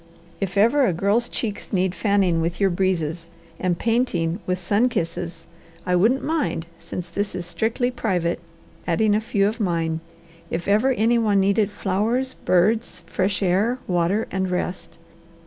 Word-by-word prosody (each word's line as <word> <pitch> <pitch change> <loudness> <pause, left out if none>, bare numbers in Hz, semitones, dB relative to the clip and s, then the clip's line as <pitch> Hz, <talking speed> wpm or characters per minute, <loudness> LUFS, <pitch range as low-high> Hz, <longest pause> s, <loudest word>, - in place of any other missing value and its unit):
If 195 0 -3
ever 245 +6 +4
a 185 - +1
girl's 200 +7 +1
cheeks 210 -4 -4
need 185 -2 +1
fanning 190 -4 +2
with 170 +1 -2
your 195 -2 +3
breezes, 170 -3 -1 0.3
and 180 -2 0
painting 200 -8 0
with 180 0 +1
sun 205 +7 +2
kisses, 170 -4 -4 0.4
I 180 - +2
wouldn't 225 +9 +3
mind, 300 - -1
since 180 - -6
this 200 -2 -3
is 180 -1 -4
strictly 220 +8 -1
private, 180 -8 -1 0.5
adding 205 +5 +2
a 215 - +2
few 200 -2 +1
of 220 +3 -3
mine; 165 -5 0 0.5
if 170 +1 -3
ever 215 +6 +3
any 235 +1 +2
one 210 -3 +3
needed 200 +1 +2
flowers, 215 +6 -1
birds, 215 +6 +1
fresh 195 +1 -1
air, 200 +7 +2
water, 180 +4 +1
and 190 -1 -1
rest! 180 -2 -3
195 Hz, 155 wpm, -23 LUFS, 175-220 Hz, 0.5 s, ever